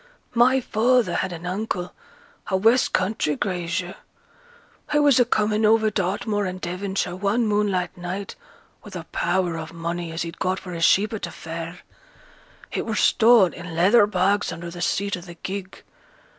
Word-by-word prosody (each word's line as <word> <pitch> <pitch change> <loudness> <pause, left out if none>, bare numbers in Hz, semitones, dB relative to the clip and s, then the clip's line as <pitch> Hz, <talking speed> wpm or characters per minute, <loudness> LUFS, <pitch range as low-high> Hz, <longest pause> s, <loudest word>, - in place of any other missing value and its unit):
My 250 +3 +4
father 245 +1 +2
had 190 - -1
an 170 0 -7
uncle, 180 -1 -3 0.5
a 190 - +1
west 225 +6 +3
country 185 -5 0
grazier. 175 0 -2 1.0
He 295 - +3
was 290 -3 +5
a 245 - +5
coming 215 -1 +1
over 220 0 +4
Dartmoor 205 +1 -1
in 185 0 -5
Devonshire 185 0 -3
one 205 +5 0
moonlight 205 -4 0
night 180 +3 -5 0.5
with - - -11
a - - -5
power 175 -3 0
o' 160 - -6
money 170 0 -4
as 165 +1 -3
he'd 170 -1 -8
got 185 0 0
for 180 - -9
his 170 -1 +1
sheep 210 +4 +3
at 220 - -4
t' - - -4
fair. 165 +2 -7 0.9
It - - -3
were - - -1
stowed 225 -5 +5
i' - - -9
leather 180 +6 +4
bags 200 +1 +1
under 170 0 -7
th' 175 0 -5
seat 200 +2 0
o' - - -9
th' 175 -1 -12
gig. 190 -1 -6
190 Hz, 170 wpm, -23 LUFS, 175-215 Hz, 1.0 s, was